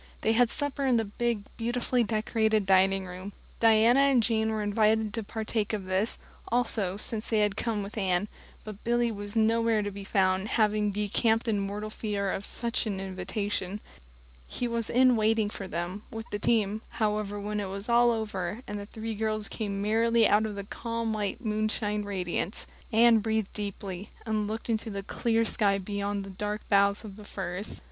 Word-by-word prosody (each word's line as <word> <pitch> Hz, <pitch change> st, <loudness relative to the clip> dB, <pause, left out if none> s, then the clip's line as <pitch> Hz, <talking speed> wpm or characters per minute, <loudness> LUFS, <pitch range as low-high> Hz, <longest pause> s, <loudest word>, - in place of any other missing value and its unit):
They 220 Hz, -, +2 dB
had 235 Hz, +1 st, +4 dB
supper 285 Hz, +2 st, -3 dB
in 250 Hz, -2 st, +4 dB
the 225 Hz, -, +1 dB
big, 225 Hz, +1 st, -1 dB
beautifully 240 Hz, +1 st, 0 dB
decorated 220 Hz, -1 st, +1 dB
dining 190 Hz, 0 st, +4 dB
room; 185 Hz, +2 st, -8 dB, 0.3 s
Diana 225 Hz, +3 st, +5 dB
and 275 Hz, -4 st, +4 dB
Jane 220 Hz, -1 st, +1 dB
were 215 Hz, -1 st, -1 dB
invited 215 Hz, +1 st, +2 dB
to 225 Hz, -, -2 dB
partake 220 Hz, 0 st, -2 dB
of 205 Hz, -3 st, -2 dB
this, 190 Hz, +4 st, 0 dB, 0.3 s
also, 220 Hz, -5 st, +1 dB
since 215 Hz, +1 st, -1 dB
they 220 Hz, -2 st, +3 dB
had 205 Hz, -1 st, +1 dB
come 220 Hz, -3 st, -1 dB
with 200 Hz, +2 st, -8 dB
Anne, 190 Hz, 0 st, +1 dB, 0.4 s
but 215 Hz, -1 st, -9 dB
Billy 240 Hz, 0 st, +2 dB
was 205 Hz, 0 st, -6 dB
nowhere 225 Hz, -1 st, +3 dB
to 205 Hz, -, -3 dB
be 200 Hz, 0 st, -7 dB
found, 190 Hz, 0 st, +1 dB
having 210 Hz, -2 st, +2 dB
decamped 215 Hz, +3 st, +1 dB
in 215 Hz, -3 st, +1 dB
mortal 205 Hz, +2 st, -4 dB
fear 205 Hz, -3 st, -2 dB
of 195 Hz, -, -4 dB
some 235 Hz, -, -1 dB
such 235 Hz, -, 0 dB
invitation. 195 Hz, 0 st, -3 dB, 0.7 s
He 245 Hz, -, -2 dB
was 235 Hz, -1 st, -1 dB
in 255 Hz, 0 st, +5 dB
waiting 215 Hz, -1 st, +2 dB
for 195 Hz, -, -6 dB
them, 175 Hz, +3 st, -4 dB
with 225 Hz, 0 st, -6 dB
the 205 Hz, -, -2 dB
team, 215 Hz, -1 st, +1 dB, 0.2 s
however, 210 Hz, -2 st, 0 dB
when 210 Hz, +1 st, -3 dB
it 200 Hz, -2 st, -3 dB
was 195 Hz, +2 st, -4 dB
all 240 Hz, 0 st, +5 dB
over, 220 Hz, -1 st, -2 dB
and 205 Hz, 0 st, -4 dB
the 200 Hz, -, -7 dB
three 225 Hz, +1 st, -5 dB
girls 215 Hz, -1 st, 0 dB
came 200 Hz, -2 st, -3 dB
merrily 230 Hz, +2 st, +4 dB
out 205 Hz, -, +5 dB
into 215 Hz, -, -3 dB
the 200 Hz, 0 st, -5 dB
calm, 230 Hz, +2 st, -3 dB
white 210 Hz, +3 st, -3 dB
moonshine 215 Hz, -1 st, 0 dB
radiance. 185 Hz, -1 st, -3 dB, 0.3 s
Anne 230 Hz, 0 st, +6 dB
breathed 220 Hz, -1 st, -1 dB
deeply, 200 Hz, -2 st, -5 dB, 0.2 s
and 215 Hz, -2 st, 0 dB
looked 220 Hz, +2 st, -4 dB
into 225 Hz, -1 st, -1 dB
the 200 Hz, -1 st, -4 dB
clear 230 Hz, +2 st, +1 dB
sky 200 Hz, -2 st, +2 dB
beyond 200 Hz, +1 st, -3 dB
the 195 Hz, -, -8 dB
dark 210 Hz, +2 st, -4 dB
boughs 200 Hz, +1 st, +3 dB
of 200 Hz, -2 st, -9 dB
the 210 Hz, -, -10 dB
firs. 195 Hz, 0 st, -4 dB
215 Hz, 185 wpm, -28 LUFS, 200-225 Hz, 0.7 s, Anne